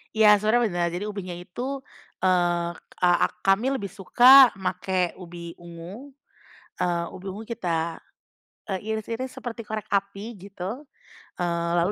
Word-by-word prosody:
Ya 210 -1 +7
sebenarnya 220 +4 +3
benar, 175 0 0
jadi 180 +4 -3
ubinya 190 -4 -5
itu, 250 +10 -5 0.4
eee, 175 -2 +2 0.3
ak 175 -1 +4
kami 220 +8 +3
lebih 200 -7 -4
suka 245 +7 +8
pake 185 -1 -1
ubi 170 -1 -8
ungu, 175 +11 -10 0.7
eee, 170 -1 0
ubi 185 - -11
ungu 195 +3 -6
kita, 170 -8 -2 0.7
e 190 - 0 0.2
iris-iris 230 +4 -4
seperti 230 -2 -7
korek 215 0 -5
api 200 +3 -2
gitu. 200 +7 -7 0.5
Eee, 170 -1 -1
lalu 175 +3 +2
195 Hz, 130 wpm, -25 LUFS, 175-220 Hz, 0.7 s, suka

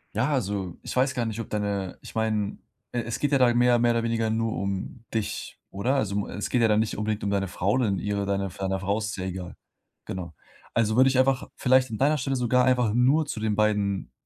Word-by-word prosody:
Ja, 115 +6 +1
also, 100 - -2
ich - - -6
weiß 130 +1 +2
gar 120 -2 -1
nicht, 110 0 -4
ob 115 - -5
deine 100 -3 -2
ich - - -12
meine, 110 -2 0 0.4
e 120 - 0
es 120 0 -4
geht 145 - 0
ja 140 - +5
da 125 -2 +4
mehr 120 0 +4
mehr 120 0 +3
oder 115 0 0
weniger 115 -1 0
nur 110 0 0
um 100 +5 -4
dich, 110 -2 -3
oder? 120 +8 0
Also, 110 -8 0
um 100 - 0
es 100 - -4
geht 125 - +2
ja 115 - +5
dann 105 -1 +3
nicht 110 0 -1
unbedingt 105 0 -2
um 100 - 0
deine 100 -1 0
Frau 95 +2 0
und 110 -7 +1
ihre 100 -1 -1
deine 100 0 -1
deiner 95 +1 -3
Frau, 100 +2 0
ist 110 -1 -2
es - - -5
ja 95 - -3
egal. 90 -1 -6 0.5
Genau. 90 -3 -6 0.4
Also, 110 -1 +2
würde 130 +2 +6
ich 130 -1 +2
einfach 130 -1 +2
vielleicht 130 -1 +3
an 110 - -3
deiner 145 +5 +3
Stelle 135 0 -1
sogar 125 +1 +3
einfach 125 -4 +2
nur 135 +7 +3
zu 130 - -5
den 110 -1 0
beiden 105 -2 0
110 Hz, 245 wpm, -26 LUFS, 100-125 Hz, 0.5 s, würde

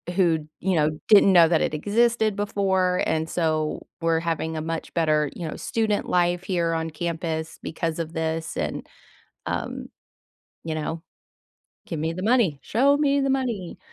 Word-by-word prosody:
who," 165 -5 +2
you 190 0 0
know, 150 -1 +3 0.2
"didn't 200 -2 +7
know 170 -2 +8
that 165 -1 +2
it - - 0
existed 220 +5 +2
before, 190 -3 +1
and 160 0 -1
so 155 -2 -1 0.2
we're 165 -1 +2
having 160 -1 -2
a - - -2
much 165 +1 -4
better," 155 -3 +2
you 170 - -5
know, 155 - -5
"student 220 -2 -1
life 175 0 +2
here 175 -3 0
on 165 0 -2
campus 160 0 -4
because 165 0 -3
of 165 0 -4
this, 160 0 -2
and" - - -3 0.6
um, - - -4 0.8
you 160 - -3
know, 160 +1 -3 0.9
"give 165 - -4
me 160 +2 -1
the 185 - -6
money, 215 - +2
show 275 +6 +3
me 285 -1 +2
the 275 0 +1
money." 240 -9 -2
170 Hz, 165 wpm, -24 LUFS, 160-200 Hz, 0.9 s, know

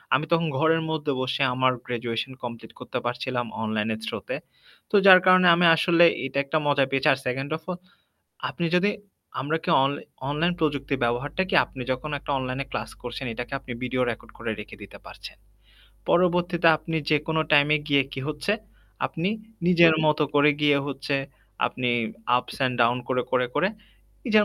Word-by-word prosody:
আমি 155 - 0
তখন 165 0 +2
ঘরের 160 +2 +3
মধ্যে 155 -2 -2
বসে 130 +2 -2
আমার 130 +1 +2
গ্র্যাজুয়েশন 120 +1 -3
কমপ্লিট 115 -2 -7
করতে - - -5
পারছিলাম। 120 0 -2 0.2
অনলাইনের 110 0 -2
থ্র-তে। - - -5 0.6
তো - - +1
যার 185 -1 +10
কারণে 185 0 +6
আমি 175 +1 +3
আসলে 170 +1 +4 0.2
এটা 135 - -5
একটা 140 +3 0
মজা 145 -1 +3
পেয়েছি। 135 -1 +1
আর 135 - -4
2nd 135 +3 -2
off 160 - -23
all 180 - -5 0.7
আপনি 170 - -3
যদি 190 +3 +3 0.5
আমরা 150 +4 -1
কি - - -3
অন 135 - +2 0.4
অনলাইন 165 +5 0
প্রযুক্তির 140 -3 -1
ব্যবহারটা 130 +9 -1
কি 190 - 0
আপনি 130 - -10
যখন 130 +4 -3
একটা 145 - -6
অনলাইনে 130 +1 -3
ক্লাস 110 +1 -4
করছেন। 125 +2 -6
এটাকে 120 +3 -6
আপনি 130 - -10
ভিডিও 125 0 -1
রেকর্ড 115 - -10
করে - - -3
রেখে - - -9
দিতে - - -12
পারছেন। - - -11 0.8
পরবর্তীতে 175 -1 +3
আপনি 160 +1 -5
যেকোনো 155 +1 +1
টাইমে 150 +1 +5
গিয়ে 140 -1 +4
কি 135 - -5
হচ্ছে, 150 +6 -1 0.5
আপনি 165 +3 -3 0.4
নিজের 170 -2 +6
মত 150 0 +2 0.2
করে 145 +1 +5
গিয়ে 145 -1 +4
হচ্ছে 140 0 -3 0.5
আপনি 125 -1 -2 0.5
আপস - - -8
অ্যান্ড 130 -2 +1
ডাউন 120 +1 +3
করে, 125 -1 0
করে, 125 -1 +2
করে, 185 - +2 0.6
নিজের 215 -3 +4
145 Hz, 170 wpm, -25 LUFS, 125-165 Hz, 0.8 s, যার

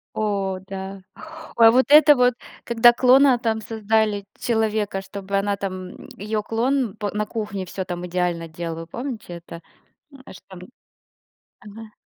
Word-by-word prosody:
О. 195 -3 -2
Да. 195 0 -7 0.6
А 225 -1 +8
вот 255 +2 +3
это 295 0 +8
вот, 250 -1 +3 0.3
когда 235 0 +5
клона 260 +1 +5
там 225 -2 -2
создали 215 -1 -1
человека, 215 -4 -1
чтобы 195 0 -4
она 200 0 0
там, 185 -1 -5 0.3
её 210 +2 -3
клон 240 0 -1
п 205 -2 -3
на 210 0 -1
кухне 210 -3 -5
всё 185 +1 -5
там 175 -1 -5
идеально 175 -1 -2
делала, 165 0 -6
помните 235 -3 -7
это? 170 0 -10 0.7
Что - - -14
там. 190 - -11 1.0
Ага. 215 +2 -12
210 Hz, 140 wpm, -22 LUFS, 190-230 Hz, 1.0 s, А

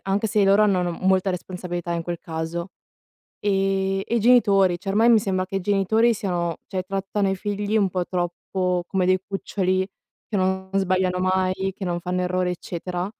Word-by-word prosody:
anche 195 +3 0
se 215 0 +1
i - - +5
loro 200 +2 +5
hanno, 195 -4 +3
no, 175 - -1
molta 190 0 +3
responsabilità 180 -1 -4
in 170 0 -2
quel 170 0 -4
caso. 165 +3 -5 0.7
Ehm, 195 -1 +1
e - - -2
i - - +2
genitori, 200 -6 +4
cioè 195 - -9
ormai 225 +4 +4
mi 230 - +7
sembra 190 -2 -1
che 195 - -4
i - - 0
genitori 205 +4 +2
siano 175 -5 -2
cioè 185 -2 -2
trattano 195 +1 -1
i 190 - -1
figli 205 +2 -2
un 200 -3 +2
po' 180 -1 -2
troppo 180 0 -2
come 190 -1 0
dei 185 0 +3
cuccioli 190 -1 -1 0.4
che 210 - -2
non 190 0 -1
sbagliano 185 -1 +1
mai, 185 +1 0
che 195 - -5
non 175 -1 -2
fanno 180 +1 -2
errori 180 0 0
eccetera. 180 0 -4
190 Hz, 190 wpm, -23 LUFS, 180-195 Hz, 0.7 s, mi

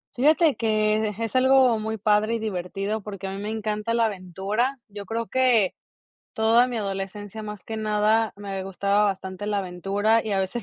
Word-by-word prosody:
Fíjate 305 +3 +4
que 215 -1 +1
es 230 +2 -3
algo 255 -3 +5
muy 220 +1 -3
padre 210 +2 +2
y 230 - -2
divertido, 195 +1 -3
porque 200 -1 -7
a 190 - -4
mí 195 - -5
me 210 - -4
encanta 215 0 -2
la 230 -1 +3
aventura. 200 +7 -2
Yo 200 0 -8
creo 225 +2 -3
que 245 -7 +3 0.6
toda 230 +1 +4
mi 240 -2 -3
adolescencia 200 +1 -5
más 210 -3 -8
que 220 - -5
nada 215 +1 +1
me 195 -2 -5
gustaba 200 +2 +1
bastante 190 -1 -3
la 205 -1 0
aventura 200 +4 0
y 215 - -2
a 195 - +1
veces 190 +5 -3
215 Hz, 180 wpm, -25 LUFS, 195-225 Hz, 0.6 s, algo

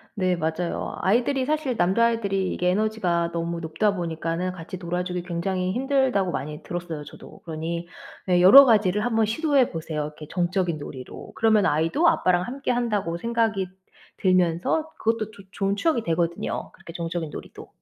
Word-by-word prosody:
네 185 -3 +1
맞아요. 170 +1 -2
아이들이 250 +6 +2
사실 295 -4 -1
남자 190 +6 +3
아이들이 200 -5 0
이게 180 - 0
에너지가 185 -4 0
너무 170 0 -3
높다 165 +6 0
보니까는 170 +1 -2
같이 180 +1 -8
놀아주기 180 0 -3
굉장히 180 +1 -2
힘들다고 260 -7 +1
많이 150 +1 -5
들었어요 175 -4 -5
저도. - - -13
그러니 170 +1 -4 0.4
예 180 -1 +4
여러 265 +10 +10
가지를 210 -4 +3
한번 225 -2 +2
시도해 275 +3 +2
보세요, 160 -2 -4
이렇게 150 0 -8
정적인 180 -1 0
놀이로. 130 -3 -9
그러면 220 -3 +3
아이도 165 - +2
아빠랑 180 - +3
함께 270 +6 -3
한다고 210 -8 -1
생각이 225 -2 0 0.5
들면서 185 - +1
그것도 220 -1 -1
조 200 - -14
좋은 195 +1 -1
추억이 240 +1 +1
되거든요, 170 -1 -2
그렇게 165 - -12
정적인 170 -1 -3
놀이도. - - -10
185 Hz, 400 characters per minute, -24 LUFS, 170-225 Hz, 0.5 s, 여러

